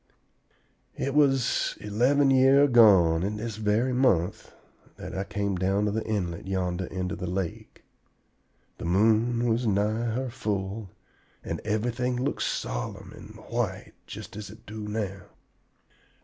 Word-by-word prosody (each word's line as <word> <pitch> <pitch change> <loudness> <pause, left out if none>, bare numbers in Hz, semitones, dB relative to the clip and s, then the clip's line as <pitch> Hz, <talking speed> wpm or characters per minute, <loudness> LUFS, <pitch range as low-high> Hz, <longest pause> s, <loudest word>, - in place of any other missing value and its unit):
"It 140 - -2
was 135 -4 +2
eleven 130 +7 +2
year 135 +1 +6
agone, 100 -11 +6
in 105 +3 -2
this 110 0 -5
very 110 +4 +1
month, 100 -10 +1 0.4
that - - -8
I 95 - -1
came 100 -1 -2
down 95 +3 +1
the 110 +1 -1
inlet 90 -5 -3
yonder 95 -1 -1
into 90 0 -4
the 90 +1 -5
lake. 90 -2 -5 1.0
The - - -5
moon 110 +6 +2
was 115 +1 +1
nigh 105 +3 +1
her 130 -1 -2
full, 100 -3 -3 0.5
and - - -4
everything 120 +4 -1
looked 130 - -2
solemn - - -3
and - - -12 0.2
white - - -2
just - - -9
as 105 -1 -7
it 110 +1 -14
do 105 0 -7
now. 105 -3 -3
105 Hz, 135 wpm, -27 LUFS, 95-120 Hz, 1.0 s, year